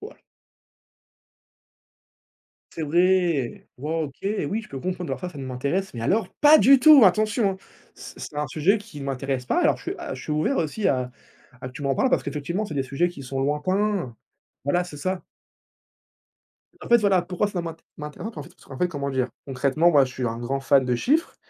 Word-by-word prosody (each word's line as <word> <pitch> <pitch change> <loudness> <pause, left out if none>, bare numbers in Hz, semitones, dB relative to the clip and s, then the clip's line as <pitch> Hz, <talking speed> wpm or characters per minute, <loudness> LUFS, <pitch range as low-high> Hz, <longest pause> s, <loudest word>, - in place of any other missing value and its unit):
voilà. - - -10 2.6
C'est 160 - -5
vrai! 170 -4 +1
Wow! 160 +3 -2
OK, 140 - -13 0.3
oui, 220 +3 -1
je - - -14
peux 135 - -6
comprendre 180 -1 -3
mais - - -1
alors 180 -1 -5
ça 145 - -11
ne 135 - -6
m'intéresse 140 +8 -2
mais 115 - -5
alors 200 - +1
pas 300 +1 +8
du 275 0 +7
tout, 305 -5 +8
attention, 215 +2 +3
hein! - - -8 0.4
C'est - - -11
c'est 145 - -8
un 150 0 -1
sujet 180 +10 +2
qui 205 -8 -11
m'intéresse 135 -1 -3
pas - - +1
alors - - +3
je - - -15
suis - - -3
à - - -5
je - - -9
suis 150 - -4
ouvert 155 - +1
aussi 170 +6 0
à 125 -1 0 0.5
à 125 - -6
que - - -13
tu 145 - -9
m'en 135 -1 +1
parles 260 - +1
parce - - +2
qu'effectivement, 170 +8 -3
c'est 160 -8 -6
des 135 - 0
sujets 140 +7 0
qui 160 -6 -10
sont 135 +1 -5
lointains. 175 - -1 0.5
Voilà, 175 +6 +1
c'est 175 -4 -9
ça. 185 +4 -3 1.6
En - - -8
fait, 235 0 +6
voilà, 195 -4 +3
pourquoi 180 +3 -1
ça 185 -4 -3
m'int 165 -1 -6 0.2
m'intéresse 150 +8 -7
pas, 150 - -7
parce - - -13 0.2
qu'en - - -22
fait - - -7
en - - -9
fait, 180 - +1
comment 140 -3 -4
dire? 130 -1 0 0.2
Concrètement, 140 +6 +2
moi, 140 -4 +5
je 130 - -8
suis 125 -1 -3
un 115 +1 -3
grand 135 +3 -2
fan 135 +1 +3
de 125 -1 0
chiffres, 310 - 0
155 Hz, 215 wpm, -24 LUFS, 135-190 Hz, 2.6 s, pas